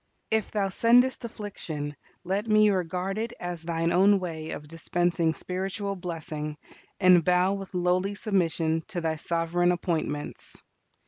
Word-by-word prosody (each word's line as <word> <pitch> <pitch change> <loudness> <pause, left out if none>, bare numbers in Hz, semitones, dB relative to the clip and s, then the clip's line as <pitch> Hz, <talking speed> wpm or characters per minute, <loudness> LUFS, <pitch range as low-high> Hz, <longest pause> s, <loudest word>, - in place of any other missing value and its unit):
If 220 -1 +1
Thou 200 -2 0
sendest 245 +5 +4
affliction, 165 -10 -5 0.3
let 195 +4 -1
me 215 -1 +5
regard 185 +2 -1
it 230 +1 -3
as 175 -2 -4
Thine 165 0 -1
own 195 +2 +5
way 160 -3 -5
of 150 -2 -6
dispensing 170 0 0
spiritual 195 +2 -3
blessing, 155 -4 -5 0.4
and 180 -3 +6
bow 180 +2 +3
with 195 -1 -6
lowly 180 +3 +1
submission 165 -6 0
to 175 - -4
Thy 160 -1 -1
sovereign 170 +2 +1
appointments. 160 -4 -3
180 Hz, 135 wpm, -27 LUFS, 165-195 Hz, 0.4 s, and